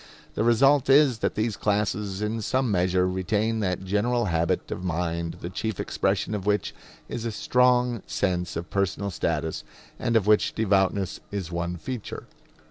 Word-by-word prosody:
The 105 Hz, -, 0 dB
result 135 Hz, +4 st, +4 dB
is 135 Hz, -4 st, +5 dB
that -, -, -1 dB
these 110 Hz, 0 st, 0 dB
classes 105 Hz, -1 st, -1 dB
in 110 Hz, +1 st, -2 dB
some 130 Hz, +2 st, 0 dB
measure 90 Hz, -1 st, +2 dB
retain 105 Hz, +5 st, 0 dB
that 95 Hz, -3 st, -1 dB
general 110 Hz, +5 st, +1 dB
habit 85 Hz, +1 st, 0 dB
of -, -, -4 dB
mind 85 Hz, -1 st, -2 dB
the 85 Hz, -, -4 dB
chief 110 Hz, +1 st, -3 dB
expression -, -, -1 dB
of 105 Hz, -1 st, -4 dB
which 105 Hz, 0 st, +1 dB, 0.3 s
is 115 Hz, -, -5 dB
a 115 Hz, -, -2 dB
strong 125 Hz, 0 st, +2 dB
sense 90 Hz, -3 st, -1 dB
of 85 Hz, +2 st, -5 dB
personal 100 Hz, 0 st, -1 dB
status, 80 Hz, -2 st, -2 dB, 0.4 s
and 115 Hz, -, 0 dB
of 110 Hz, -4 st, +3 dB
which 105 Hz, 0 st, +3 dB
devoutness 100 Hz, -2 st, +1 dB
is 95 Hz, -4 st, -4 dB
one 85 Hz, +1 st, -2 dB
feature. 120 Hz, +5 st, -6 dB
100 Hz, 160 wpm, -26 LUFS, 90-115 Hz, 0.4 s, is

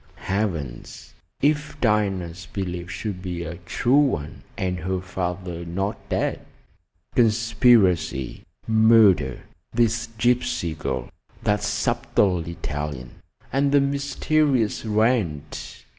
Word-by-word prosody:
Heavens! 90 Hz, -, -4 dB, 0.3 s
If 150 Hz, +1 st, +1 dB
Diana's 95 Hz, -6 st, 0 dB
belief 90 Hz, -3 st, -4 dB
should 90 Hz, +1 st, -4 dB
be 90 Hz, -2 st, -4 dB
a 85 Hz, 0 st, -6 dB
true 120 Hz, +6 st, 0 dB
one, 100 Hz, -, 0 dB, 0.2 s
and 90 Hz, -1 st, -1 dB
her 95 Hz, +2 st, -2 dB
father 90 Hz, -1 st, -4 dB
not 95 Hz, +4 st, -2 dB
dead? -, -, -1 dB, 0.7 s
Conspiracy! 110 Hz, -, +3 dB, 0.3 s
murder! 110 Hz, -, +5 dB, 0.3 s
this 115 Hz, 0 st, +1 dB
gypsy 120 Hz, -7 st, +1 dB
girl, 65 Hz, -2 st, -3 dB, 0.4 s
that 105 Hz, 0 st, +1 dB
subtle 95 Hz, -2 st, +1 dB
Italian, 75 Hz, -6 st, -5 dB, 0.4 s
and 140 Hz, +1 st, +2 dB
the 145 Hz, -, +6 dB
mysterious 140 Hz, -3 st, +1 dB
Wrent! 110 Hz, -, -1 dB
95 Hz, 100 wpm, -24 LUFS, 85-115 Hz, 0.7 s, the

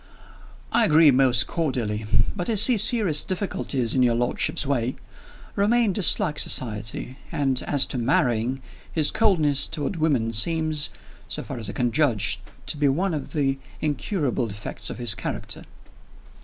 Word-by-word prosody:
"I 235 Hz, 0 st, +3 dB
agree 155 Hz, -3 st, +5 dB
most 130 Hz, -3 st, +3 dB
cordially. 120 Hz, -10 st, -2 dB, 0.3 s
But 175 Hz, -, -4 dB
I 225 Hz, -, 0 dB
see 240 Hz, +5 st, +7 dB
serious 210 Hz, -, +4 dB
difficulties 145 Hz, -, -3 dB
in 130 Hz, -, +1 dB
your 120 Hz, -2 st, +3 dB
lordship's 120 Hz, +4 st, -1 dB
way. 130 Hz, -3 st, -1 dB, 0.6 s
Romayne 215 Hz, +1 st, +2 dB
dislikes 160 Hz, -5 st, +3 dB
society; 115 Hz, +3 st, -2 dB
and, 135 Hz, -3 st, 0 dB
as 145 Hz, -2 st, +4 dB
to 130 Hz, -, -4 dB
marrying, 125 Hz, +1 st, 0 dB, 0.3 s
his 155 Hz, -3 st, 0 dB
coldness 155 Hz, -11 st, +2 dB
toward 160 Hz, +2 st, -4 dB
women 135 Hz, -8 st, 0 dB
seems 155 Hz, +5 st, +1 dB, 0.4 s
(so -, -, -4 dB
far -, -, -7 dB
as 110 Hz, -3 st, -3 dB
I -, -, -6 dB
can 120 Hz, -1 st, -1 dB
judge) 125 Hz, -6 st, +1 dB, 0.3 s
to -, -, -1 dB
be 145 Hz, 0 st, +1 dB
one 175 Hz, +7 st, -1 dB
of 145 Hz, -3 st, -6 dB
the 135 Hz, -3 st, -1 dB, 0.2 s
incurable 145 Hz, -, -2 dB
defects 105 Hz, 0 st, -7 dB
of -, -, -7 dB
his 120 Hz, -3 st, +1 dB
character." 115 Hz, -, -6 dB
140 Hz, 150 wpm, -23 LUFS, 120-165 Hz, 0.6 s, see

